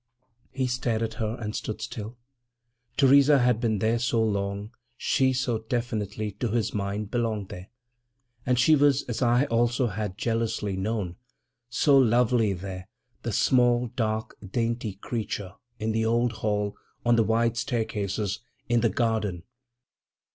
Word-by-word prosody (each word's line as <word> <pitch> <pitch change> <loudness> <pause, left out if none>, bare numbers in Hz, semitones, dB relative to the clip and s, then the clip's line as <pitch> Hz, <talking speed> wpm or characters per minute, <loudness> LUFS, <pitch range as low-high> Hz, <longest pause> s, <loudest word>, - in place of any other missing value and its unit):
He 130 -1 -2
stared 120 -2 -1
at 110 - -2
her 110 +2 -1
and 105 -2 -4
stood 110 - -4
still. 110 +2 -6 0.8
Theresa 140 +1 +6
had 125 -3 +2
been 110 -3 +1
there 110 +4 +1
so 120 -1 +1
long, 100 0 -2 0.3
she 130 0 +2
so 125 -3 0
definitely, 110 -2 -3
to 120 - 0
his 115 -1 -1
mind, 100 +1 -3
belonged 110 -5 -1
there. 90 +1 -9 0.7
And 125 0 +1
she 140 +5 +5
was, 145 -1 +3
as 120 0 -4
I 120 +2 +4
also 120 0 +1
had 105 -3 -3
jealously 115 -3 -1
known, 95 -2 -2 0.5
so 135 +3 +4
lovely 120 -3 +3
there, 95 0 -7 0.3
the - - -3
small, 120 -2 +3
dark, 110 -1 -1
dainty 115 +1 -2
creature, 105 -1 -4 0.2
in 110 +1 -1
the 110 0 +1
old 120 +1 +2
hall, 105 -1 0 0.3
on 120 0 +5
the 115 - +4
wide 115 +1 +1
staircases, 110 -5 -2 0.3
in 120 -1 +2
the 115 - +3
garden.... 110 -8 -1
115 Hz, 145 wpm, -26 LUFS, 105-120 Hz, 0.8 s, Theresa